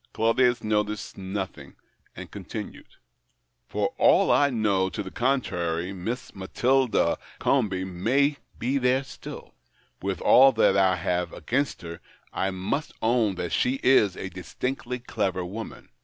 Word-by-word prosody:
Claudius 120 +2 +2
noticed 105 -1 -1
nothing, 95 0 -6 0.4
and - - -9
continued - - -7 0.3
— - - -47
" - - -50
For - - -1
all - - +5
I 145 - +4
know 100 -6 +1
to 105 +3 -4
the 95 - -8
contrary, 90 -9 -1
Miss 110 +7 -5
Matilda 125 +6 +1 0.2
Comby 100 -8 +1
may 125 +11 +1 0.2
be 130 +4 0
there 130 +1 +2
still. 135 - -10 0.5
AVith 95 -2 -2
all 135 +2 +7
that 95 - +3
I 95 -1 +4
have 90 -1 -1
against 140 -5 -2
her, 85 0 -7 0.3
I 95 - 0
must 95 +11 -3
own 110 -4 +2
that 90 -1 -4
she 125 +2 +1
is 110 -8 +4
a 95 - -5
distinctly 125 +7 -4
clever 100 -7 -2
woman. 110 +5 -8
105 Hz, 140 wpm, -26 LUFS, 95-125 Hz, 0.5 s, all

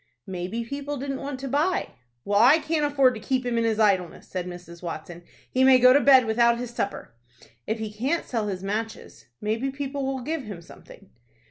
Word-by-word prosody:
"Maybe 190 +4 -4
people 285 +3 -5
didn't 275 0 -4
want 275 -1 -5
to 275 - -4
buy." 305 +8 0 0.4
"Well, 205 0 +2
I 255 +8 +7
can't 315 -1 -1
afford 270 -3 +4
to 220 - -7
keep 255 +3 -1
him 245 -1 -1
in - - +1
his 220 -1 0
idleness," 190 -5 +1
said 180 -1 -4
Mrs. 175 -1 -10
Watson. 170 0 -7 0.3
"He 260 - +2
may 260 -1 +7
go 255 0 +7
to 285 - +6
bed 265 -3 +6
without 235 +1 +3
his 240 0 -5
supper." 200 - -4 0.5
"If 220 - -1
he 220 -1 -5
can't 265 +10 -1
sell 225 -4 -2
his 190 -2 -4
matches, 220 -2 -5
maybe 225 +5 -1
people 275 0 -4
would 255 -2 -6
give 320 +1 -2
him 205 -5 -7
something." 195 +3 -16
235 Hz, 205 wpm, -25 LUFS, 205-270 Hz, 0.5 s, I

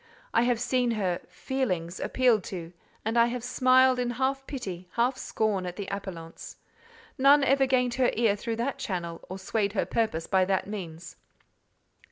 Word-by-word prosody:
I - - +4
have 245 -2 +1
seen 250 0 +1
her 185 -4 -1
feelings 185 -11 -2
appealed 245 -6 +2
to, 175 -2 -7 0.3
and 225 +2 +2
I 235 - +6
have 240 0 -4
smiled 255 +1 +4
in 245 -1 0
half 270 +1 -1
pity, 185 -10 -6
half 245 +3 +2
scorn 210 -7 -1
at 175 - -5
the 200 - -5
appellants. 180 -5 -7 0.6
None 280 +2 +6
ever 270 0 +3
gained 250 -2 +2
her 250 - +5
ear 220 -3 +3
through 225 +2 -3
that 240 +4 -2
channel, 170 -3 -4
or 185 - -5
swayed 200 +1 -1
her 210 - 0
purpose 220 -8 -1
by 190 -1 +3
that 190 0 0
means. 180 -4 -7
225 Hz, 170 wpm, -28 LUFS, 185-255 Hz, 0.6 s, I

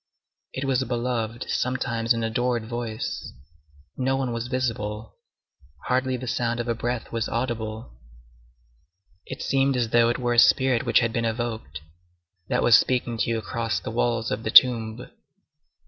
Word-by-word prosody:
It 130 - -4
was 135 -1 +1
a 130 - -3
beloved, 120 -2 -2
sometimes 115 -2 -1
an 115 -1 +2
adored, 120 0 -1
voice. 115 -2 -5 0.6
No 130 +1 0
one 130 -3 -2
was 115 +1 -4
visible. 115 -4 -3 0.7
Hardly 130 0 0
the 130 - -7
sound 120 -1 -1
of 120 - -3
a 120 - +1
breath 120 +1 -4
was 115 -1 -2
audible. 115 - -4 1.3
It - - -6
seemed 135 -1 +1
as 120 -2 0
though 115 0 +4
it 120 - 0
were 120 -1 0
a 120 - +4
spirit 120 +4 +4
which 115 - +4
had 115 -1 -1
been 115 - -1
evoked, 110 - -4 0.7
that - - +1
was 115 - +7
speaking 125 -2 -1
to - - 0
you 115 - 0
across 115 0 -2
the - - -6
walls 115 -1 0
of 105 - -2
the 110 - -3
tomb. 115 -1 +5
120 Hz, 160 wpm, -25 LUFS, 115-125 Hz, 1.3 s, was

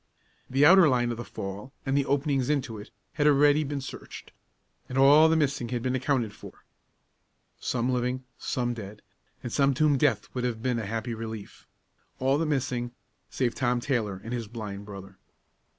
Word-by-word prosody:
The 135 +3 +4
outer 175 -1 +8
line 120 -2 +1
of 115 - -4
the 120 - -5
fall, 100 +4 -7
and 135 0 0
the 140 -1 +1
openings 140 -2 +1
into 130 -7 -1
it, 105 - -10 0.2
had 150 -1 +2
already 145 +1 +5
been 140 -1 -3
searched; 130 - -9 0.6
and 125 - -4
all 145 +4 +7
the 160 - +3
missing 140 -6 0
had 120 -1 -2
been 130 - 0
accounted 130 -4 0
for - - -13 0.9
some 125 +1 -1
living, 125 +1 -1 0.2
some 120 -1 -1
dead, 105 -2 -9 0.4
and 120 - -5
some 140 -1 +3
to 155 - +1
whom 145 -3 +2
death 130 -8 +2
would 125 - -3
have 115 -2 -2
been 125 -2 0
a 110 - -4
happy 115 +3 -3
relief 110 -2 -8 0.5
all 135 +2 +2
the 165 - 0
missing, 125 -4 -1 0.4
save 125 -3 -1
Tom 125 -2 0
Taylor 115 -7 -1
and 115 - -5
his 115 -3 -3
blind 105 -3 -7
brother. 95 -2 -10
125 Hz, 180 wpm, -27 LUFS, 115-140 Hz, 0.9 s, outer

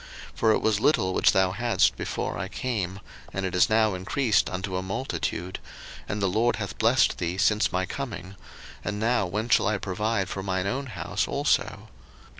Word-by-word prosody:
01:030:030 - - -24
For 110 - +4
it - - +1
was 110 -2 +2
little 95 -8 +2
which - - +4
thou 95 -1 +3
hadst 120 +4 +2
before - - -3
I - - -3
came, 100 -6 -3 0.3
and 95 0 -2
it 95 - -3
is 90 +4 +4
now 110 -1 +3
increased 105 +4 +1
unto 95 +1 -4
a 90 - -1
multitude; 95 -3 -3 0.5
and 105 - -2
the 100 - +1
LORD 110 +6 +2
hath 100 -4 -6
blessed 115 +2 +3
thee 90 +1 -2
since 105 +2 +2
my 95 0 0
coming: 100 -7 -6 0.5
and 105 0 -3
now 110 -3 +1
when 105 +5 -2
shall 120 - +4
I 105 0 +1
provide 100 +1 -1
for 95 - -4
mine 95 -1 -1
own 135 +7 -2
house 90 -8 -2
also? - - 0
100 Hz, 190 wpm, -26 LUFS, 95-115 Hz, 0.5 s, For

